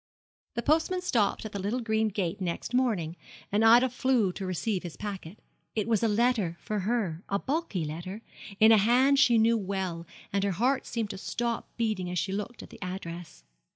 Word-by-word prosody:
The 235 - -2
postman 325 +4 +2
stopped 225 - +1
at 215 - -5
the 200 - -4
little 210 +6 -1
green 220 -2 +1
gate 195 -2 -2
next 175 +6 -3
morning, 210 -11 +1 0.4
and 210 +2 +2
Ida 235 +3 +7
flew 250 -5 +1
to 190 0 -5
receive 185 +2 -1
his 175 -3 -8
packet. 200 -3 -6 0.4
It 215 -1 0
was 225 -2 +2
a 230 - +3
letter 215 -5 +1
for 210 -1 -3
her 195 -5 -1
a 200 - +1
bulky 265 - -2
letter 180 +8 -6 0.4
in 220 +1 +7
a 220 - +7
hand 255 +6 +4
she 240 -3 +5
knew 225 +1 +4
well, 190 -4 -3 0.3
and 200 -1 +1
her 200 -1 +1
heart 255 +8 +1
seemed 225 -3 -2
to 195 - -7
stop 235 +3 -3
beating 215 -6 -1
as 180 - -3
she 190 - -1
looked 210 +4 -4
at - - -13
the - - -13
address. 175 - -7
210 Hz, 195 wpm, -28 LUFS, 185-235 Hz, 0.4 s, Ida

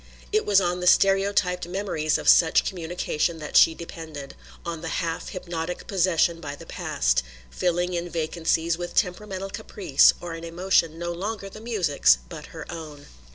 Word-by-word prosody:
It 430 0 +1
was 200 -1 +6
on 180 -1 -1
the 180 - -2
stereotyped 195 -2 +3
memories 175 -5 -1
of - - -7
such 165 -2 +5
communication 170 -2 -2
that 150 -2 -8
she 165 - +7
depended, 160 -4 -8 0.3
on 170 -2 -4
the 165 - -5 0.2
half 165 -1 -4
hypnotic 175 -1 -5
possession 175 -3 +1
by 145 -2 -6
the - - -12
past; - - 0 0.3
filling 175 - 0
in 175 0 -3
vacancies 165 0 -1
with 175 0 -6
temperamental 195 +1 -1
caprice 200 -10 +3
or 175 -1 -6
an 165 0 -8
emotion 170 -1 +1
no 175 +1 -3
longer 195 +3 -4
the 215 - -11
music's 180 - +3
but - - -9
her - - -9
own. 155 -4 -9
175 Hz, 160 wpm, -25 LUFS, 160-185 Hz, 0.3 s, she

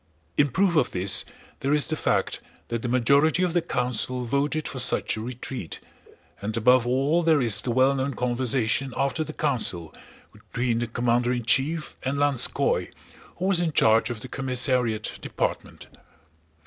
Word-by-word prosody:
In 145 - +4
proof 185 +6 +1
of 155 - +3
this 95 +1 +1 0.3
there 140 +2 +1
is 150 - +2
the 155 - -1
fact - - 0 0.3
that 115 -1 -2
the 125 - -3
majority 140 +8 +3
of 180 -2 0
the 175 - +2
council 125 -1 -1
voted 145 +5 -1
for 130 - -6
such 125 0 0
a 110 - -5
retreat, 125 -5 -6 0.6
and 105 +2 -3
above 125 +2 +4
all 135 +7 +2
there 160 -3 +3
is 110 -5 +3
the - - -5
well 130 +3 +3
known 135 0 -2
conversation 125 +1 0
after 140 +3 0
the 155 - -7
council, 115 - -1 0.4
between 120 -2 -2
the 120 - -2
commander 120 +1 0
in 120 -2 -2
chief 150 +6 0
and 135 +2 -2
Lanskóy, 145 -3 +1 0.4
who 180 - -4
was 190 -2 +2
in 165 -3 -1
charge 110 -1 +4
of 115 -3 -5
the - - -8
commissariat 125 -4 -1
department. - - -4
130 Hz, 165 wpm, -25 LUFS, 120-145 Hz, 0.6 s, In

